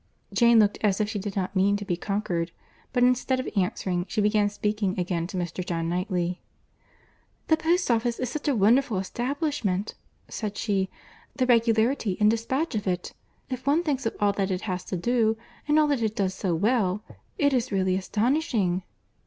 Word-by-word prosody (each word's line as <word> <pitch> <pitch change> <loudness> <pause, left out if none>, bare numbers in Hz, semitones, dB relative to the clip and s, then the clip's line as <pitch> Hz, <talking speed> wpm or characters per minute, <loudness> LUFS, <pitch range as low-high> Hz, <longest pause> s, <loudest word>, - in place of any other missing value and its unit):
Jane 235 -1 +5
looked 210 -2 +4
as 205 -2 +2
if 210 -1 0
she 210 - -3
did 195 0 -5
not 190 0 -2
mean 200 +2 +3
to 205 - -6
be 175 - 0
conquered; 180 -3 -2 0.4
but 245 -1 +2
instead 250 +1 +2
of 255 - -3
answering, 180 -2 -1
she - - -2
began 210 0 +3
speaking 210 -1 -1
again 175 -2 -1
to 185 - -6
Mr. 175 +1 -3
John 165 -2 -2
Knightley. 180 0 -1 1.1
"The 315 - +5
post 335 -1 +1
office 235 0 +1
is 255 +1 -3
a 285 - +3
wonderful 225 +2 +3
establishment!" 240 - -2 0.3
said 210 -2 -5
she.—"The 200 +6 -3
regularity 230 -3 +2
and 210 0 +5
despatch 260 +8 -1
of 210 -3 -2
it! 180 -1 -2 0.4
If 255 +1 -5
one 305 +5 +3
thinks 275 -7 -1
of - - -3
all 205 -1 +3
that 195 -1 -1
it 185 -1 -1
has 185 -4 -3
to 185 - -3
do, 225 +3 +1 0.3
and 300 +1 +3
all 305 - +5
that 280 -5 +1
it 220 -1 0
does 190 -2 0
so 185 -2 -1
well, 210 0 +1 0.3
it 285 -2 +3
is 245 -2 0
really 190 -2 +1
astonishing!" 215 - 0
210 Hz, 180 wpm, -26 LUFS, 190-245 Hz, 1.1 s, Jane